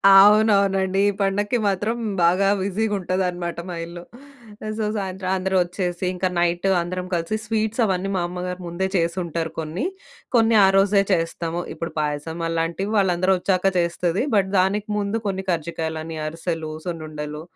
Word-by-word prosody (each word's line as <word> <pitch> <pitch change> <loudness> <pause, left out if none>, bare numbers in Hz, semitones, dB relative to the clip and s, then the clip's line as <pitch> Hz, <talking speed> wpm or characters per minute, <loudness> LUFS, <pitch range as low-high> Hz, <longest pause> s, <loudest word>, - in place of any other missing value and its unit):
అవునవునండి. 195 -2 +5
ఈ - - +2
పండక్కి 205 +4 +1
మాత్రం 205 +4 0 0.3
బాగా 185 +3 +4
బిజీగుంటదనమాట 185 -4 -1
మా 175 - -4
ఇల్లు. 170 +1 -9 0.8
సో, 215 - 0
సాయంత్రం 190 -1 -3
అందరూ 190 +1 -1
ఒచ్చేసి 180 0 -3
ఇంకా 185 +1 0
నైటు 175 +2 +1
అందరం 180 +1 -4
కలిసి 170 +4 -1
స్వీట్సవన్నీ 215 -3 0
మా - - 0
అమ్మగారు 180 +1 -5
ముందే 180 +3 -1
చేసుంటారు 170 -1 -1
కొన్ని. 160 - -3 0.5
కొన్ని 225 -1 +4
ఆ - - +5
రోజే 195 0 +4
చేస్తాము. 165 0 -1
ఇప్పుడు 165 - -5
పాయసం 150 +3 -3
అలాంటివి 165 +5 -1
వాళ్ళందరూ 185 -1 +3
ఒచ్చాక 185 -1 0 0.2
చేస్తది. 170 +4 0
బట్ 195 -2 +3
దానికి 200 +3 +1
ముందు 205 +2 -1
కొన్ని 190 0 -2
కర్జికాయలు, 160 -1 -2 0.3
అరిసెలు, 165 0 -4 0.2
సున్నుండలు 155 -3 -5
185 Hz, 135 wpm, -23 LUFS, 170-195 Hz, 0.8 s, అవునవునండి